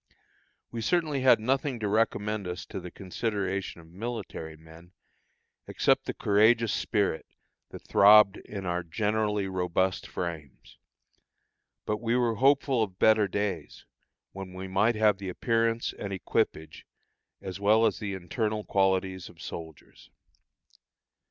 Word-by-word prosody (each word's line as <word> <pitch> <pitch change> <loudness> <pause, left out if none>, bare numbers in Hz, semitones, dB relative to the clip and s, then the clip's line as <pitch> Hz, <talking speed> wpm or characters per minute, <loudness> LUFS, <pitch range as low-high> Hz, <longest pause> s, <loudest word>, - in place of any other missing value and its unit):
We 115 - -4
certainly 155 -1 0
had 130 -3 +6
nothing 130 +2 -1
to 105 - -2
recommend 105 -1 0
us 90 0 -5
to - - -6
the 90 -1 -8
consideration 95 -1 -3
of 80 0 -18
military 95 -6 -6
men, 80 +3 -16 0.7
except - - +1
the - - -3
courageous 110 +2 +3
spirit 100 -7 -1 0.4
that - - -11
throbbed 105 0 +6
in 100 -2 -8
our 90 0 -1
generally 105 +3 -1
robust 95 0 -1
frames. 80 -6 -7 1.1
But 105 - -1
we 115 0 0
were 120 -2 +2
hopeful 135 +1 +3
of 95 -4 -3
better 110 -1 +4
days, 95 -6 -4 0.5
when 95 -1 -8
we 95 +1 -7
might 100 +5 +2
have 105 -2 +3
the 95 -1 -5
appearance 115 +3 0
and 100 - -6
equipage 80 -4 -2 0.5
as 95 0 -7
well 110 +3 +4
as 110 - 0
the 100 -2 -4
internal 105 +4 -3
qualities 95 -2 0
of 80 - -18
soldiers. 80 -3 -10
100 Hz, 130 wpm, -28 LUFS, 90-110 Hz, 1.1 s, had